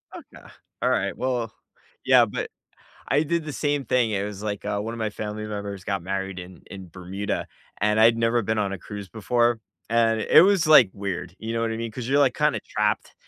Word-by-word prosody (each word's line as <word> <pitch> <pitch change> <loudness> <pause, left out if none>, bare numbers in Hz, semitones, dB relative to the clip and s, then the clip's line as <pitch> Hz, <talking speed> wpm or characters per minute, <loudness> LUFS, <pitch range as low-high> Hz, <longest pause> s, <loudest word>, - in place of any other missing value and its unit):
Okay. - - -13 0.4
Alright, - - 0
well 125 -3 -2 0.5
yeah, - - +6
but - - -4 0.6
I 145 - +3
did 165 +1 -1
the 150 - -5
same 145 -2 -1
thing, 120 -1 +1
it 100 -1 -1
was 105 0 -7
like, 105 -2 -4
uh, 100 - -1
one 115 +2 -4
of 115 - -8
my 110 -1 -1
family 105 +1 -5
members 100 -2 -6
got 100 -3 -2
married 95 0 -4
in 90 -1 -11
in 95 -2 -10
Bermuda, 95 +4 -4 0.3
and 105 +1 +2
I'd 115 +1 +6
never 115 +1 +2
been 110 +2 -1
on 100 -2 0
a 100 - -5
cruise 100 -2 -8
before, 120 +2 +1 0.3
and 115 -1 +2
it 155 - +6
was, 190 -4 +3
like, 135 -10 +7
weird, 95 -3 -5
you 110 +1 -5
know 115 - -1
what 115 0 0
I 110 - -3
mean, 115 0 -4
'cause 120 0 -6
you're, 140 +2 +3
like, 140 -3 +3
kinda - - +1
trapped, - - -1
110 Hz, 210 wpm, -24 LUFS, 100-120 Hz, 0.6 s, like